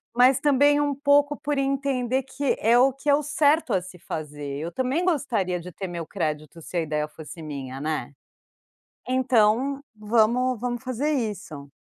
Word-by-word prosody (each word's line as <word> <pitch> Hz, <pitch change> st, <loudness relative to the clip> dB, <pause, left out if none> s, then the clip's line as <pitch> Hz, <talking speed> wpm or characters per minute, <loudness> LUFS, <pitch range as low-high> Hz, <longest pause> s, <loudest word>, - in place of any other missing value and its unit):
mas 250 Hz, +2 st, +5 dB
também 290 Hz, 0 st, +4 dB
um 290 Hz, -1 st, 0 dB
pouco 285 Hz, +1 st, +3 dB
por 290 Hz, 0 st, -1 dB
entender 270 Hz, -2 st, 0 dB
que 265 Hz, +1 st, -1 dB
é 230 Hz, +3 st, +4 dB
o 265 Hz, +2 st, +5 dB
que 275 Hz, +3 st, -4 dB
é 285 Hz, -, +7 dB
o 295 Hz, -, 0 dB
certo 295 Hz, -2 st, +2 dB
a 190 Hz, -, +2 dB
se 180 Hz, 0 st, -12 dB
fazer. 145 Hz, -3 st, -6 dB
Eu 165 Hz, +3 st, -4 dB
também 260 Hz, -, -1 dB
gostaria 245 Hz, -, 0 dB
de 180 Hz, +1 st, -9 dB
ter 190 Hz, +2 st, -5 dB
meu 170 Hz, -2 st, -5 dB
crédito, 155 Hz, -3 st, -4 dB
se 175 Hz, -, -6 dB
a -, -, +2 dB
ideia 150 Hz, -1 st, -2 dB
fosse 160 Hz, +2 st, -11 dB
minha, 135 Hz, -4 st, -6 dB
né? 155 Hz, -1 st, -3 dB, 1.0 s
Então, 255 Hz, +1 st, +2 dB
vamos 230 Hz, +3 st, +2 dB
vamos 240 Hz, -1 st, -2 dB
fazer 255 Hz, +3 st, -1 dB
isso. 205 Hz, -, -4 dB
245 Hz, 175 wpm, -25 LUFS, 170-275 Hz, 1.0 s, é